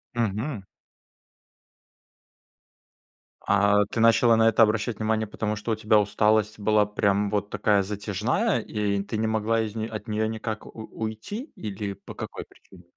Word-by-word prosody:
Мгм. 115 +1 -2 2.8
А 100 0 +4
ты 110 - -5
начала 115 +1 +5
на 115 0 +5
это 115 - +5
обращать 110 +1 0
внимание, 110 0 0
потому 105 0 -3
что 105 +2 -4
у - - +2
тебя 110 0 +3
усталость 105 +1 +1
была 105 0 +3
прям 100 0 +1
вот 100 -1 -1
такая 105 -1 +2
затяжная, 105 - -1
и 105 -2 -1
ты 110 - -4
не 110 +1 0
могла 110 +1 +1
из 110 -1 -4
нее 110 0 -3
от 110 +1 -7
нее 110 0 0
никак 110 -1 -5
у - - -11
уйти 110 - -6
или 100 -1 -5
по 100 - -12
какой - - -7
причине? 90 -2 -19
110 Hz, 155 wpm, -25 LUFS, 105-110 Hz, 2.8 s, начала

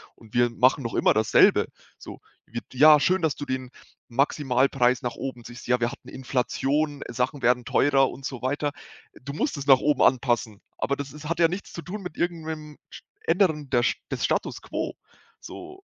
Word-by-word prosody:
und 110 -2 -19
wir 120 0 +3
machen 130 +3 +2
noch 115 - -4
immer - - +4
dasselbe. 110 0 +4 0.3
So - - -10 0.3
wird 120 +1 -7
ja 150 +3 +7
schön, 185 +5 +2
dass 160 -3 +1
du 145 - -6
den 130 -1 -4 0.4
Maximalpreis 130 -1 +1
nach 120 - -2
oben 130 -3 -6
ziehst. 120 +1 -11
Ja, 125 0 +2
wir 120 +2 +1
hatten - - -12
Inflation, 135 +3 -1
Sachen 125 +3 -2
werden 125 0 +3
teurer 135 -1 +3
und 135 - -9
so 130 -3 -5
weiter. 145 +3 -1 0.5
Du 140 +2 -7
musst 150 - -1
es 140 - -6
nach 135 -2 +8
oben 150 +2 +1
anpassen, 120 -4 +1 0.2
aber 140 - 0
das 140 -1 -7
ist 150 0 -8
hat 170 0 -2
ja 165 - +6
nichts 185 +4 -6
zu 170 - -7
tun 200 +3 -6
mit 180 -3 -8
irgendeinem 160 -3 -4
sch - - -11 0.3
ändern 160 -5 +1
der 120 -2 +2 0.3
des - - -1
Status - - -1
quo, - - -4 0.4
so. 375 +1 -11
135 Hz, 190 wpm, -25 LUFS, 125-150 Hz, 0.5 s, nach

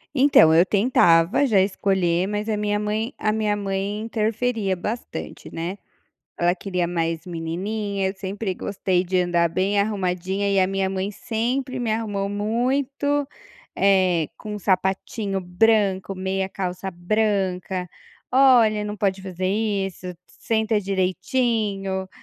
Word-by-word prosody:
Então, 260 - +6
eu 170 +3 +6
tentava 195 -1 +4
já 220 -7 +3
escolher 190 -2 +1
mas 210 +2 -3
a 215 - 0
minha 205 0 0
mãe 215 +3 -2
a 215 - 0
minha 215 -1 0
mãe 200 0 -2
interferia 220 -2 -1
bastante, 215 +6 -6
né. 170 +4 -4 0.6
Ela 175 +1 +3
queria 180 -2 -2
mais 165 -1 -2
menininha, 190 +4 -3
eu 190 - -4
sempre 195 0 -4
gostei 185 -1 -1
de 185 0 0
andar 175 -1 +2
bem 190 +4 +1
arrumadinha 195 -1 -1
e 195 -1 +3
a 185 - +4
minha 195 0 0
mãe 190 +1 -2
sempre 245 +5 -2
me 235 -2 -1
arrumou 205 -3 -2
muito, 265 +7 0 0.5
eh, 185 -5 +3
com 210 -1 -7
um - - -4
sapatinho 195 +1 -1
branco, 195 +1 +1
meia 190 0 -2
calça 190 0 -4
branca, 185 -1 -1 0.4
"olha 245 -5 +5
não 210 0 -4
pode 195 -2 0
fazer 185 -1 -4
isso, 195 -3 -2 0.2
senta 220 -1 0
direitinho", 195 0 -1
195 Hz, 130 wpm, -23 LUFS, 185-215 Hz, 0.6 s, Então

